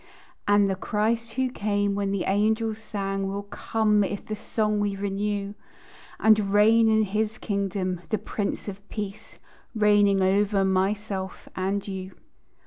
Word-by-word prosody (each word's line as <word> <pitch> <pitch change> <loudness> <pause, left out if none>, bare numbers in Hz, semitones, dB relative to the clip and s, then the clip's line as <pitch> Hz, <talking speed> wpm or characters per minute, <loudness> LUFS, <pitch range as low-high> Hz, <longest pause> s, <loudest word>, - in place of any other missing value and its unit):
And 205 0 +5
the 195 - +1
Christ 225 +4 -1
who 260 0 0
came 205 -2 0
when 200 0 -1
the 195 -2 -1
angels 220 +2 +1
sang 195 -3 -3
Will 200 +1 -3
come, 210 +1 +1
if 200 +1 -4
the 215 - -4
song 210 0 -1
we 205 -1 0
renew, 200 0 -2 0.7
And 215 -2 +4
reign 220 +2 +5
in 220 0 +4
his 215 +2 -1
kingdom, 195 -4 -2
the 215 - +1
Prince 205 0 -3
of 200 0 -8
Peace, 210 +1 -6 0.4
Reigning 205 -2 +4
over 195 +1 +2
myself 190 0 -1
and 195 +2 -1
you. 190 -1 -6
205 Hz, 140 wpm, -26 LUFS, 195-215 Hz, 0.7 s, And